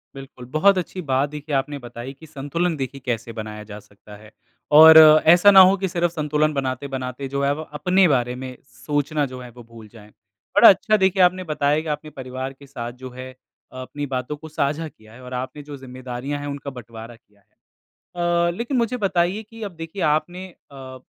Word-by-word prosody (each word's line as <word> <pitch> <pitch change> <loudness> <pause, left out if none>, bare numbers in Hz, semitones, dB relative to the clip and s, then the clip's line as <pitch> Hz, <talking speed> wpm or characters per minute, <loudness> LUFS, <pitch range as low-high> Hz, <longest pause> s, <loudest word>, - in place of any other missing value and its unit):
बिल्कुल, 135 -2 -11
बहुत 185 +9 +3
अच्छी 185 +1 -4
बात 135 -1 0
देखिए 150 -1 -5
आपने 145 +2 -2
बताई 120 +2 -9
कि 160 - -13
संतुलन 155 +4 -2
देखिए 135 0 -5
कैसे 115 -1 -3
बनाया 110 -1 -7
जा 105 0 -10
सकता 105 +1 -16
है। 110 +1 -16 0.5
और 160 0 +10 0.3
ऐसा 175 +5 +7
ना 195 - +8
हो 195 - +2
कि 190 0 -2
सिर्फ 175 -1 -1
संतुलन 155 -1 0
बनाते-बनाते 130 0 -4
जो 140 +1 -3
है 140 +1 +2
वो 155 - -6 0.2
अपने 180 +3 +3
बारे 125 -4 0
में 130 0 -8 0.3
सोचना 145 0 -1
जो 130 -1 -9
है 125 - -10
वो 120 +1 -14
भूल 115 -1 -14
जाएँ। 105 -2 -15 0.5
बड़ा - - +9
अच्छा 215 - +3
देखिए 190 -1 +3
आपने 185 +1 +2
बताया 150 -2 0
कि 160 - -9
आप 150 - -1
अपने 155 +1 -13
परिवार 130 0 -6
के 140 +1 -17
साथ 120 -3 -6
जो 130 - -6
है 130 +1 -9 0.4
अ, 130 - -8
अपनी 145 +3 -6
बातों 130 +2 -4
को 160 +1 -11
साझा 150 +2 -2
किया 110 -6 -18
है 125 - -14
और 125 0 -9
आपने 130 +3 -5
जो 145 -1 -9
जिम्मेदारियाँ 130 +2 -6
है 145 - -6
उनका 140 0 -6
बटवारा 115 -1 -11
किया 105 -3 -29
है। 100 - -35 0.7
अ, 170 0 +1
लेकिन 245 +3 -2
मुझे 235 +1 0
बताइए 195 0 0
कि 225 +1 -14
अब 200 - -5
देखिए 165 +4 -7
आपने 175 +5 -1 0.2
अ, 130 -1 -10
140 Hz, 205 wpm, -22 LUFS, 125-165 Hz, 0.7 s, और